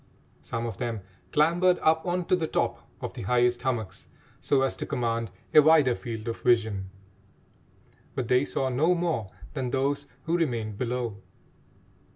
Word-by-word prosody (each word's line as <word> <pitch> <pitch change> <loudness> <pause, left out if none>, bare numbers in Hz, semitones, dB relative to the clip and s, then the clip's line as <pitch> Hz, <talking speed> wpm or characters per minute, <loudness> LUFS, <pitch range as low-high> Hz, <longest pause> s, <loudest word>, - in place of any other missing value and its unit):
Some 115 0 -4
of 110 -5 -5
them 115 -2 -3 0.3
clambered 175 +4 +4
up 160 +2 +3
on 175 0 0
to 185 - +3
the 165 -3 -1
top - - -2
of - - -4
the - - -7
highest 120 +3 +2
hummocks 120 -5 -3 0.3
so 135 -1 +2
as 135 - 0
to - - -4
command 115 -2 -1 0.2
a 150 - +9
wider 150 -4 +5
field 115 -3 -6
of 115 - -4
vision, 110 -6 +2 1.3
but 130 -3 -2
they 125 +2 +4
saw 135 -2 -1
no 155 +8 +3
more 165 - -1 0.2
than 130 -4 -2
those 135 +3 0 0.2
who 165 +1 0
remained 115 -10 -2
below. 120 -4 -2
125 Hz, 160 wpm, -27 LUFS, 115-155 Hz, 1.3 s, a